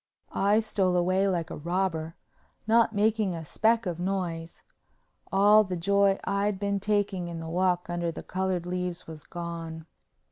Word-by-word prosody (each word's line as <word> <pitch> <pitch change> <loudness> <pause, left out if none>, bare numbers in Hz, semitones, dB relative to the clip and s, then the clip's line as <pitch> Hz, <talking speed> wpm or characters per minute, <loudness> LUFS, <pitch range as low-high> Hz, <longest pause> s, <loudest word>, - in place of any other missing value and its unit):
I 205 +3 +3
stole 190 -4 +1
away 185 +2 +2
like 175 -4 -1
a - - -4
robber, 165 0 -2 0.5
not 225 +1 +4
making 210 -2 +1
a 165 - -6
speck 225 +7 +1
of 175 -2 -3
noise. 175 -3 -3 0.7
All 205 +2 +6
the 185 -3 -4
joy 200 +2 +3
I'd 200 0 0
been 200 0 0
taking 200 -3 0
in 170 -1 -6
the 165 - -6
walk 180 +1 +1
under 175 -1 -2
the - - -8
colored 185 -2 -2
leaves 180 0 -3
was 155 -2 -10
gone. 165 -2 -6
185 Hz, 155 wpm, -28 LUFS, 170-200 Hz, 0.7 s, All